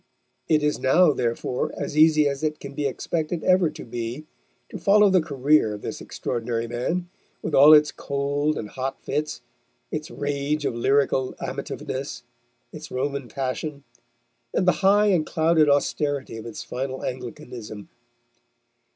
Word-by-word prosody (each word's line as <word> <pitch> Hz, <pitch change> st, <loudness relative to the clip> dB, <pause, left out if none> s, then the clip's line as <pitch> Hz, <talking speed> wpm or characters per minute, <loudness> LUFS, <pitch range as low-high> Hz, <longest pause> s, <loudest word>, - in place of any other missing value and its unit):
It 155 Hz, -2 st, +3 dB
is 150 Hz, 0 st, +1 dB
now, 155 Hz, +4 st, +4 dB
therefore, 120 Hz, 0 st, -2 dB
as -, -, -4 dB
easy 155 Hz, -1 st, +5 dB
as 140 Hz, -1 st, -2 dB
it 155 Hz, -1 st, -1 dB
can 140 Hz, 0 st, -8 dB
be 145 Hz, 0 st, -1 dB
expected 160 Hz, +4 st, -3 dB
ever 185 Hz, -3 st, +4 dB
to -, -, -10 dB
be 120 Hz, +5 st, -5 dB, 0.4 s
to -, -, -7 dB
follow 205 Hz, 0 st, +5 dB
the 185 Hz, -2 st, +4 dB
career 140 Hz, -6 st, +2 dB
of 105 Hz, -, -11 dB
this -, -, -5 dB
extraordinary 115 Hz, 0 st, -3 dB
man, 145 Hz, +10 st, -2 dB, 0.4 s
with 160 Hz, -, -3 dB
all 145 Hz, +3 st, +8 dB
its 150 Hz, -1 st, +7 dB
cold 145 Hz, +2 st, -1 dB
and 105 Hz, -, -5 dB
hot 130 Hz, +3 st, -4 dB
fits, 150 Hz, 0 st, -3 dB, 0.5 s
its 155 Hz, +3 st, -4 dB
rage 145 Hz, 0 st, -2 dB
of -, -, 0 dB
lyrical 135 Hz, +2 st, +1 dB
amativeness, -, -, -5 dB, 0.5 s
its -, -, -9 dB
Roman 140 Hz, 0 st, -3 dB
passion, 140 Hz, +3 st, -4 dB, 0.7 s
and 185 Hz, -, +1 dB
the -, -, +8 dB
high 205 Hz, +2 st, +5 dB
and 180 Hz, -5 st, +3 dB
clouded 160 Hz, -2 st, +3 dB
austerity 145 Hz, -2 st, 0 dB
of 115 Hz, -, -8 dB
its 115 Hz, -, -7 dB
final 130 Hz, +1 st, -4 dB
Anglicanism. 120 Hz, -4 st, -7 dB
145 Hz, 150 wpm, -24 LUFS, 130-155 Hz, 0.7 s, all